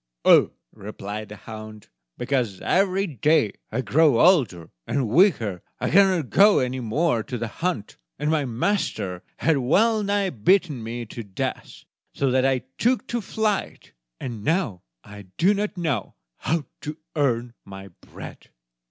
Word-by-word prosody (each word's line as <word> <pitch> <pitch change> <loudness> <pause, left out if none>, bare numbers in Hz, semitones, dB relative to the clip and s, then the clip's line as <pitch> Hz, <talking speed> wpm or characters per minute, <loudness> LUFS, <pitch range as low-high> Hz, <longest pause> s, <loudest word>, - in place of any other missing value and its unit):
"Ah," - - +7 0.3
replied 105 0 -7
the 105 - -8
hound, 110 -1 -10 0.3
"because 125 -6 -1
every 195 +1 +2
day 150 - +2 0.2
I 120 +4 -1
grow 135 +2 +3
older 120 - +3 0.2
and 135 -4 0
weaker; 115 - +3 0.2
I - - -1
cannot 185 -7 +4
go 205 +1 +6
any 130 0 0
more 120 +2 0
to 125 +3 -5
the 115 0 -3
hunt, 145 - -4 0.2
and 150 +1 -1
my 155 -2 +1
master 120 - -2 0.2
has 160 -3 +2
well 215 - +3
nigh 200 -2 0
beaten 150 - +2
me 115 +2 -5
to 115 - -8
death, 100 -4 -5 0.3
so 135 -2 +1
that 130 +1 +3
I 130 -2 0 0.2
took 250 +2 +2
to 240 -1 -1
flight; 215 0 -2 0.3
and 115 -5 -6
now 130 - 0 0.2
I 105 -1 -12
do 185 +5 +4
not 205 -1 -3
know 145 - -2 0.2
how 160 -3 -1
to 150 +1 -6 0.2
earn 125 -5 0
my 95 0 -10
bread." - - -12
130 Hz, 150 wpm, -24 LUFS, 110-180 Hz, 0.3 s, Ah